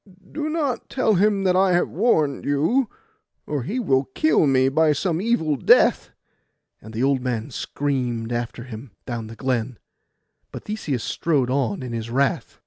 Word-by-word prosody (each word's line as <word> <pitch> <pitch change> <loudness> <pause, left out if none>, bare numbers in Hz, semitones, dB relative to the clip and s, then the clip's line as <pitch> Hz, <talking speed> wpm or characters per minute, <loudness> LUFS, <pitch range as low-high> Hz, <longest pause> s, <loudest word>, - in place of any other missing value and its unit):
'Do 305 0 -3
not 300 -6 -2
tell 255 -4 +1
him 200 +1 +2
that 185 -1 +2
I 190 0 +4
have 175 - +2
warned 160 - +1
you, 165 - +1 0.6
or 145 -2 -2
he 210 - -3
will 135 - +2
kill 155 -1 +3
me 130 -1 +3
by 155 +3 +3
some 170 +3 -1
evil 195 -10 +1
death;' 125 - +4 0.7
and 110 - -11
the 115 +3 -2
old 135 -1 +2
man 125 0 -3
screamed 125 -4 -2
after 120 0 -4
him 120 +1 -9 0.2
down 115 -3 -5
the 115 - -10
glen; 125 -2 -2 0.7
but - - -8
Theseus 160 - -3
strode 140 -7 0
on 130 -4 -1
in 125 -2 -5
his 115 0 -4
wrath. 135 +3 -1
140 Hz, 165 wpm, -23 LUFS, 125-185 Hz, 0.7 s, I